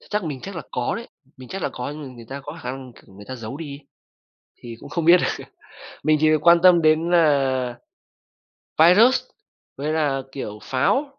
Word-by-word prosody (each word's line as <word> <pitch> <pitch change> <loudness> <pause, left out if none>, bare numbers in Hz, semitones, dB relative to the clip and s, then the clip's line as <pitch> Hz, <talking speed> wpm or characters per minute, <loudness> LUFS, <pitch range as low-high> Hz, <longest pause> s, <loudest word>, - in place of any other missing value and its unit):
Ch - - -21
chắc 210 -2 -1
mình 145 -5 -5
chắc 195 +4 -8
là 165 - -5
có 125 -1 -2
đấy, 230 - -7 0.3
mình 130 -2 -12
chắc 195 - -6
là - - 0
có 125 +2 -6
nhưng 150 +1 -8
mà 140 - -8
người 115 -1 -12
ta 140 +1 -6
có 145 +4 -9
khả - - -4
năng, 130 -1 -9
kiểu, 95 - -20
người 100 +1 -12
ta 130 - -5
giấu 115 +3 -7
đi 150 -2 -7
ấy, 140 +1 -12 0.8
thì 120 -1 -8
cũng - - -12
không 170 -2 -2
biết 175 +2 +8
được. - - -2 0.6
Mình 155 0 +3
chỉ 155 - +4
việc 155 +1 +1
quan 170 0 +7
tâm 180 -2 +6
đến 160 +1 +3
là 135 -7 +2 1.0
Viruss 215 +11 +6 0.5
với 150 +3 -3
là, 145 -4 0
kiểu, 105 -6 -6
Pháo, 275 - -1
150 Hz, 220 wpm, -22 LUFS, 130-170 Hz, 1.0 s, biết